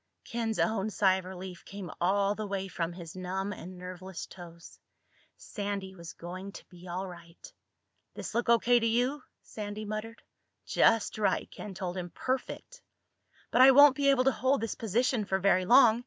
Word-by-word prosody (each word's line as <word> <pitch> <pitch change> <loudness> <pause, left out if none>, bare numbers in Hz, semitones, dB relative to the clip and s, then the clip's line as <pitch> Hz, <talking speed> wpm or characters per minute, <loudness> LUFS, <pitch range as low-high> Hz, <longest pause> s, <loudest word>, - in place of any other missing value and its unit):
Ken's 225 -2 -2
own 220 -1 +1
sigh 190 -2 +3
of 190 - -7
relief 185 -1 -8
came 195 -4 -8
all 195 +3 +2
the 215 0 -5
way 195 -1 -3
from 170 -2 -3
his 170 -1 -9
numb 190 +2 -3
and 185 -1 -9
nerveless 185 0 -7
toes. 170 -2 -13 0.6
Sandy 200 -2 -5
was 170 -3 -10
going 185 +3 -8
to - - -11
be 180 0 -13
all 185 +2 -4
right. 170 -1 -13 0.6
"This - - -6
look 235 0 0
O.K. 235 +1 +5
to 230 - +1
you?" 250 +6 +1 0.2
Sandy 210 0 -6
muttered. 215 +2 -6 0.4
"Just 225 -1 +2
right," 210 - 0
Ken 205 -3 -8
told 180 0 -4
him. 175 -1 -4
"Perfect." 265 - -4 0.7
"But 250 - +4
I 260 - +10
won't 285 0 +8
be 280 0 +2
able 265 -2 +4
to 270 - +4
hold 265 +2 +1
this 225 - -2
position 230 +2 0
for 190 -1 0
very 190 -1 +3
long. 235 0 +6
200 Hz, 175 wpm, -30 LUFS, 185-230 Hz, 0.7 s, I